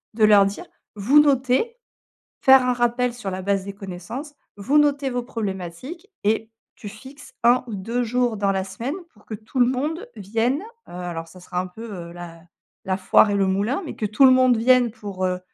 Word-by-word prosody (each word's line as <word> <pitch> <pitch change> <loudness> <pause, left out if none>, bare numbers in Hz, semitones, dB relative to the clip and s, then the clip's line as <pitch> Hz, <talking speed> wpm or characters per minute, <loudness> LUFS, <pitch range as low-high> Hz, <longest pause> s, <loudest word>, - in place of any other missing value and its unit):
de 220 - +1
leur 205 -2 +6
dire: 195 - -6 0.3
«Vous 235 +9 +4
notez, 275 - +1 0.6
faire 265 -1 +7
un 250 - +2
rappel 240 0 0
sur 235 -5 -6
la 185 0 -4
base 195 0 0
des 200 - -6
connaissances, 200 - -8 0.2
vous 235 +9 +1
notez 285 -2 +1
vos 245 -1 -3
problématiques.» 225 - -6 0.2
et 220 +1 +1 0.3
tu 215 - -10
fixes 260 +5 -13
1 245 +2 +4
ou 225 - -5
2 230 +6 -2
jours 245 -1 0
dans 200 -1 +1
la 190 -1 -1
semaine 230 - -5 0.2
pour 210 - -24
que 220 - -5
tout 220 +5 -6
le 245 - +5
monde 305 - -3
vienne, 230 - -1 0.3
heu, - - -12
alors 175 -2 -6
ça 185 +3 -15
sera 180 0 -4
un 185 - -6
peu, 200 +5 -11 0.3
heu, - - -12
la 170 -1 -10 0.4
la 190 -1 -1
foire 190 +2 +4
et - - 0
le 200 -1 +2
moulin, 205 - -1
mais - - -7
que 215 - -3
tout 215 +6 +4
le 260 - +7
monde 255 -2 +4
vienne 245 +1 +4
pour, 200 -4 -5
heu, 180 0 -1
225 Hz, 210 wpm, -22 LUFS, 195-255 Hz, 0.6 s, faire